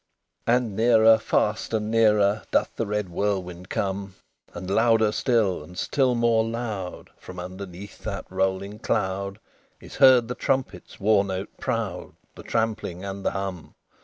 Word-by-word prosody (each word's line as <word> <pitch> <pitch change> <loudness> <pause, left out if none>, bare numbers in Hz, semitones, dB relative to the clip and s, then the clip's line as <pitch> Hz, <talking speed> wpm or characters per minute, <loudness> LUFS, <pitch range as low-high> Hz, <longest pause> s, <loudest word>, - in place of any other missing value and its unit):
XXI 115 - +4
And 120 -5 -1
nearer 110 0 +6
fast 110 0 0
and 110 0 -2
nearer 105 -2 +3
Doth - - +1
the - - -2
red 105 -2 -2
whirlwind 90 -1 -3
come; 95 0 -3 0.4
And 95 - -7
louder 110 +1 +3
still 110 - +1
and 90 +4 -13
still 130 +1 +1
more 115 -1 +3
loud, 110 -5 -5
From 90 -1 -10
underneath 95 +2 -8
that 100 -2 -5
rolling 95 +2 -1
cloud, 100 -4 -1 0.4
Is - - -11
heard 130 -4 +7
the 125 - -3
trumpet's 130 -9 -2
war 100 0 +4
note 95 0 -5
proud, 115 -8 -3 0.2
The - - -11
trampling, 105 -5 -2
and 100 0 -6
the - - +2
hum. 95 -4 -5
105 Hz, 150 wpm, -25 LUFS, 95-115 Hz, 0.4 s, heard